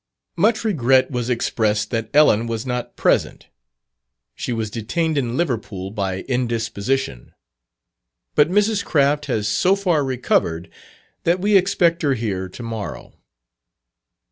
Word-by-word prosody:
Much 215 +7 +2
regret 135 - +3
was 125 -1 -2
expressed 110 -3 0
that 115 -2 -2
Ellen 130 -7 +4
was 115 0 -3
not 125 -1 -4
present. - - 0 0.8
She - - -5
was 110 -2 -2
detained 155 +9 -1
in 125 -4 -1
Liverpool 110 - -3
by 95 -3 -3
indisposition. 120 - -2 1.0
But 150 +1 +4
Mrs. 205 +2 +2
Craft 145 0 +1
has 105 -2 -1
so 180 - +3
far 180 -7 +1
recovered, 125 -10 -1 0.5
that 175 +2 +2
we 205 +2 +2
expect 175 -3 +3
her 140 -3 +2
here 95 -5 -3
to 120 - -10
morrow. 115 -3 -6
125 Hz, 125 wpm, -21 LUFS, 110-160 Hz, 1.0 s, Ellen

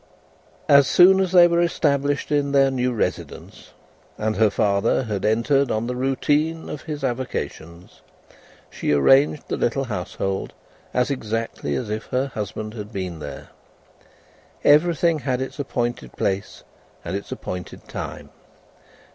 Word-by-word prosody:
As 140 -1 +6
soon 190 +2 +6
as 190 -2 +1
they 175 -2 +8
were 170 0 +2
established 145 -4 0
in 145 -1 +1
their 135 -1 +4
new 125 -1 0
residence, 115 - -4 0.5
and 110 0 -1
her 110 -1 +4
father 100 +4 +1
had 105 -5 -4
entered 115 +6 +2
on 110 +1 -1
the 125 +1 -3
routine 145 +5 0
of 150 - -6
his 150 -3 -6
avocations, 105 -9 -5 0.7
she - - -2
arranged 135 - +4
the - - -2
little 135 +3 0
household 95 -3 -4 0.4
as 125 +2 +1
exactly 115 - -3
as 110 -4 -3
if 110 0 -4
her 130 +2 -1
husband 105 +1 -5
had 105 -2 -8
been 95 -5 -5
there. 70 -2 -8 1.1
Everything 165 +1 +4
had 130 -2 -1
its 130 +3 -5
appointed 120 -5 -3
place 95 0 -3 0.4
and 85 - -3
its 100 - -6
appointed 90 0 -7
time. - - -7
125 Hz, 140 wpm, -22 LUFS, 105-145 Hz, 1.1 s, they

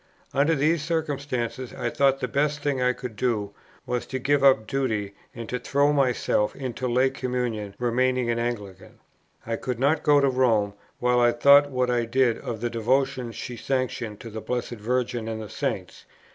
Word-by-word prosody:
Under 145 +4 +3
these 155 +3 +2
circumstances 140 -6 -3
I 120 - -2
thought 135 -1 +2
the 125 - 0
best 145 +3 0
thing 140 -3 0
I 125 0 +3
could 125 -3 -7
do 105 -4 -1 0.3
was 125 -1 -2
to 130 - -3
give 140 +2 +1
up 130 -5 +5
duty 110 -6 -2 0.2
and 115 -1 -6
to 125 - -2
throw 140 +3 +2
myself 125 -6 +1
into 130 -1 -4
lay 130 +2 +2
communion, 125 -6 -3
remaining 125 +1 +1
an 115 - -1
Anglican. 105 -6 -5 0.5
I 115 0 -2
could 125 -2 -3
not 145 +5 +2
go 145 -1 +5
to 140 - +3
Rome, 115 -6 +2 0.2
while 125 0 +2
I 120 0 +5
thought 140 +4 +6
what 125 -2 0
I 120 -1 +1
did 120 0 +2
of 115 -3 -5
the 120 - -1
devotions 125 +1 0
she 125 - -6
sanctioned 120 -4 -2
to 115 - -8
the 110 +1 -6
Blessed 125 +1 -3
Virgin 120 0 -1
and 110 -1 -4
the 110 -2 -7
Saints. - - -4
125 Hz, 185 wpm, -25 LUFS, 115-135 Hz, 0.5 s, thought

